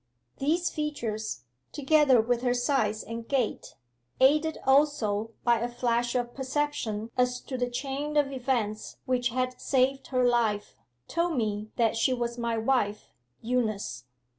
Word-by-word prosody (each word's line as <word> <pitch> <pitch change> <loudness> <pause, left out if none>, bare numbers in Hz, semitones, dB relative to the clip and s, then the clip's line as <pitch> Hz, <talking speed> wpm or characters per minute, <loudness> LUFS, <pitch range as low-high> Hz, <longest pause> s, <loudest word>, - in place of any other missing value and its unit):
These 330 +6 +1
features, 235 - -3 0.3
together 290 -3 +4
with 240 +1 0
her 250 -1 +1
size 245 -4 +1
and 230 0 -7
gait, 260 -6 -1 0.4
aided 305 +4 +4
also 230 -6 +2
by 235 -1 +3
a 240 +2 -2
flash 240 0 0
of 240 -1 -1
perception 265 -5 -2
as 250 0 +1
to 265 - -6
the 245 -1 -1
chain 280 +4 -3
of 285 -2 +3
events 245 -5 -2
which 250 -1 +1
had 255 +1 -2
saved 270 0 +1
her 255 -1 +1
life, 225 -4 0 0.3
told 335 -2 0
me 215 -2 -1
that 230 -2 +2
she 240 +3 +2
was 240 0 -3
my 235 -1 -1
wife 220 -3 0 0.3
Eunice. 215 - -1
245 Hz, 140 wpm, -28 LUFS, 225-270 Hz, 0.4 s, together